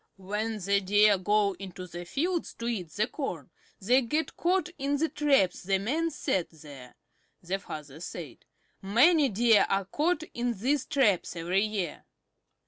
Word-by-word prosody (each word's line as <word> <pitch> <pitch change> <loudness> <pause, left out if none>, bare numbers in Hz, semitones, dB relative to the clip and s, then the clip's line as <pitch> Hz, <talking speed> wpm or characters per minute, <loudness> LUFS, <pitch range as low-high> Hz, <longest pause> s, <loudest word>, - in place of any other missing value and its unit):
"When 210 +4 -3
the 200 0 +1
Deer 205 +1 +4
go 205 +1 +2
into 185 -2 -8
the 175 0 -8
fields 335 - -2
to 230 - -7
eat 195 -8 -3
the 210 +7 0
corn 180 - -5 0.3
they 245 +7 +3
get 300 +5 -2
caught 360 +1 +1
in 280 +1 0
the 320 +2 0
traps 275 -12 +2
the 195 +1 +1
men 300 +12 -1
set 190 - -1
there," 145 -5 -13 0.5
the 185 +3 -2
father 150 -5 -9
said. 175 - -8 0.4
"Many 275 - +4
Deer 225 +1 +4
are 195 0 +1
caught 315 - 0
in 240 0 -1
these 265 +6 0
traps 250 - +1
every 175 +3 0
year." 205 -7 -3
210 Hz, 155 wpm, -28 LUFS, 185-275 Hz, 0.5 s, Deer